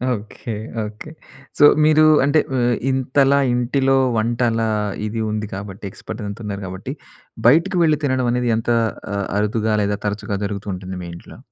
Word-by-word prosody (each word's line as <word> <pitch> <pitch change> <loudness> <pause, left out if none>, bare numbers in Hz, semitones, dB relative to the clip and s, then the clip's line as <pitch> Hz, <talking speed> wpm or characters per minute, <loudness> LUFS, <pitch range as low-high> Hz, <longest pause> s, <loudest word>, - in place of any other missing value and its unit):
Okay. 110 +2 -7 0.3
Okay. 105 +8 -9 0.5
So - - +7 0.2
మీరు 155 0 +5 0.2
అంటే 145 +2 +3 0.2
ఆహ్, 120 -1 +2 0.2
ఇంతలా 135 +1 +2
ఇంటిలో 130 +2 +1 0.2
వంటల 115 +1 +1 0.5
ఇది 110 +1 -3
ఉంది 105 0 -3
కాబట్టి 100 0 -8
ఎక్స్‌పర్ట్ 110 +3 -8
అంత 100 +2 -6
ఉన్నారు 100 -1 -4
కాబట్టి, 95 +1 -6 0.5
బయటికి 165 +8 +4
వెళ్లి 155 -2 +3
తినడం 130 -2 +1
అనేది 125 0 0
ఎంత 115 - -3 0.5
ఆహ్, 100 -1 -2
అరుదుగా 110 +1 0
లేదా 100 0 -1
తరచుగా 105 0 -2
జరుగుతూ 100 0 -5
ఉంటుంది 95 0 -6
మీ - - -7
ఇంట్లో? - - -13
115 Hz, 150 wpm, -20 LUFS, 105-130 Hz, 0.5 s, So